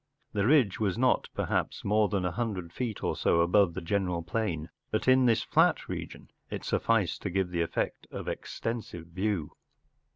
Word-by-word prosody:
The 100 0 +1
ridge 130 -9 +4
was 105 -2 0
not, 130 +1 +2
perhaps, - - -1
more 105 0 +3
than 95 -1 0
a 90 - 0
hundred 95 -7 -3
feet 120 -5 -3
or - - 0
so 85 - +3
above 90 0 +3
the 95 - -3
general 90 -1 -1
plain, 85 -4 -2 0.2
but 110 - -1
in 130 0 +6
this 115 -1 +3
fiat - - +3
region - - -7 0.2
it - - -5
sufficed 105 -7 +1
to 100 - -2
give 95 0 0
the 85 -1 0
effect 85 - -2
of - - -7
extensive 110 -8 -4
view. 90 -2 -2
100 Hz, 175 wpm, -29 LUFS, 85-110 Hz, 0.2 s, in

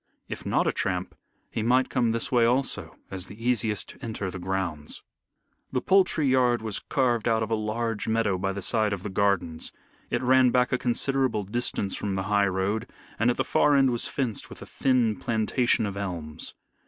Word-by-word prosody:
If - - -6
not - - +2
a - - +2
tramp - - -2 0.4
he 115 - -2
might 125 +4 +2
come 120 -3 +2
this 115 0 -1
way 120 -2 +4
also 125 +3 0 0.2
as 95 -2 -5
the 100 - -11
easiest 110 -5 +1
to - - -12
enter 110 -5 -3
the 90 - -6
grounds. 90 -5 -3 0.7
The 130 - +1
poultry 185 -2 +3
yard 125 -3 +3
was 110 -3 -2
carved 120 -4 0
out 110 -1 +2
of 110 - -5
a - - +3
large 110 0 -2
meadow 110 -4 +1
by 95 +1 -1
the 100 0 -5
side 110 0 +1
of 95 -2 -5
the 105 - -4
gardens. 95 -5 0 0.4
It - - -1
ran 130 0 +5
back 125 +1 +2
a 130 - +1
considerable 130 -2 +1
distance 100 -2 -1
from 100 -2 -2
the 95 - -1
high 100 -1 +4
road, 95 +3 -1 0.3
and 115 +2 +3
at 120 - 0
the - - +2
far 145 -1 +3
end 135 -2 +4
was 120 - -1
fenced 125 -7 -2
with - - -10
a - - -9
thin 125 -6 +1
plantation 110 +4 +1
of 100 -1 -4
elms. 85 -6 -5
110 Hz, 200 wpm, -26 LUFS, 100-125 Hz, 0.7 s, ran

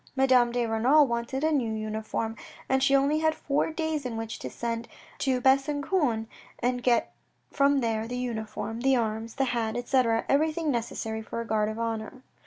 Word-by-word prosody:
Madame 260 -3 +4
de 240 0 0
Renal 245 +7 +4
wanted 235 +3 -2
a 315 - +3
new 255 -7 +1
uniform, 220 +1 -3 0.3
and 265 0 +2
she 275 +1 +4
only 280 +3 +3
had 315 0 +2
four 280 +1 0
days 315 -2 -2
in 240 -3 -4
which 225 0 -5
to 130 - -5
send 230 - -4 0.3
to 260 -2 +1
Besancon 275 - +2 0.3
and 245 0 -1
get 245 -1 +2 0.4
from 280 -1 +3
there 225 -1 -1
the 245 +1 -4
uniform, 225 -2 -4
the 270 +1 +4
arms, 225 -1 -2
the 270 - +1
hat, 235 -2 -1
etc., 245 -2 +1
everything 310 +2 +1
necessary 225 -2 -3
for 220 - -6
a 230 - -3
Guard 215 -1 +1
of 215 - -5
Honour. 230 +2 -4
245 Hz, 180 wpm, -27 LUFS, 225-275 Hz, 0.4 s, Madame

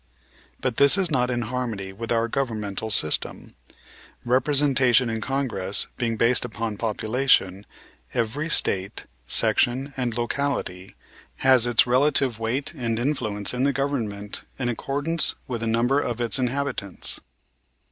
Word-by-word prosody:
But 125 -3 -3
this 140 +6 +7
is 185 -4 0
not 125 -3 0
in 120 -1 -2
harmony 110 -5 -5
with 115 +4 -7
our 115 0 +1
governmental 110 -5 -4
system. 75 -7 +4 0.7
Representation 130 -2 +2
in 110 0 -4
Congress 115 -8 0
being 115 -2 -3
based 120 +2 +3
upon 115 -2 -5
population, 110 -3 0 0.4
every 125 +8 -3
State, 95 - +2 0.2
section 130 - +2
and 120 -3 -3
locality 120 -7 -4 0.5
has 130 -3 +5
its 120 -1 +3
relative 130 -1 +1
weight 120 +5 -2
and 115 -2 -3
influence 115 -6 -1
in 125 - -3
the 140 - +2
government 115 -7 -4
in 125 -2 -3
accordance 145 +7 0
with 120 -4 -5
the 115 - -3
number 120 +5 +1
of 120 -4 -4
its 120 +2 0
inhabitants. 130 -6 -3
120 Hz, 130 wpm, -23 LUFS, 110-135 Hz, 0.7 s, this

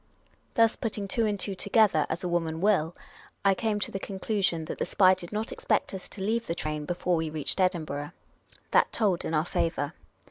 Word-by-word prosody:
Thus, 230 -1 +4
putting 210 -3 -3
two 225 +2 +2
and 205 -1 -1
two 195 +1 -1
together, 205 -4 +3
as 170 - -3
a - - -1
woman 165 -2 -1
will, 180 -4 +2 0.5
I 195 - +6
came 210 +1 -1
to - - -1
the 195 - -3
conclusion 190 -4 -1
that - - -6
the - - 0
spy 185 -1 +5
did 180 -2 -6
not 215 +2 -2
expect 215 - 0
us 190 - -7
to 200 - -7
leave 230 +3 0
the 170 - -1
train 150 -2 -3
before 175 +2 0
we 160 -1 -1
reached 155 +4 -1
Edinburgh. 155 -6 0 0.6
That - - +4
told 200 -6 +1
in 160 - -1
our 155 +1 +2
favour. 165 -5 -1
185 Hz, 205 wpm, -28 LUFS, 160-210 Hz, 0.6 s, I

